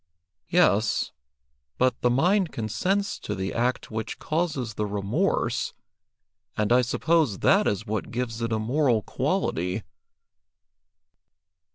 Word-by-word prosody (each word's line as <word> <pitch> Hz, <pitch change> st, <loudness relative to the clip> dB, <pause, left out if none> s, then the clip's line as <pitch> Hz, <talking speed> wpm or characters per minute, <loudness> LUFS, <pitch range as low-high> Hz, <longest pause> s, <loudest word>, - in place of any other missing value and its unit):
"Yes, 115 Hz, -, +3 dB, 0.7 s
but 130 Hz, 0 st, +1 dB
the 125 Hz, -, +3 dB
mind 175 Hz, +8 st, +2 dB
consents 190 Hz, -, -1 dB
to 105 Hz, -, -4 dB
the 95 Hz, +1 st, -3 dB
act 125 Hz, +1 st, -1 dB
which 110 Hz, 0 st, -4 dB
causes 155 Hz, -8 st, -2 dB
the 105 Hz, 0 st, -2 dB
remorse, 100 Hz, 0 st, -1 dB, 0.8 s
and 105 Hz, +1 st, 0 dB
I 125 Hz, -, +6 dB
suppose 145 Hz, -, +1 dB
that 200 Hz, -, +4 dB
is 105 Hz, +1 st, -1 dB
what 110 Hz, -1 st, -3 dB
gives 115 Hz, -1 st, -3 dB
it 115 Hz, 0 st, -1 dB
a 110 Hz, -, +1 dB
moral 120 Hz, 0 st, +1 dB
quality." 90 Hz, +1 st, -1 dB
120 Hz, 120 wpm, -26 LUFS, 105-155 Hz, 0.8 s, I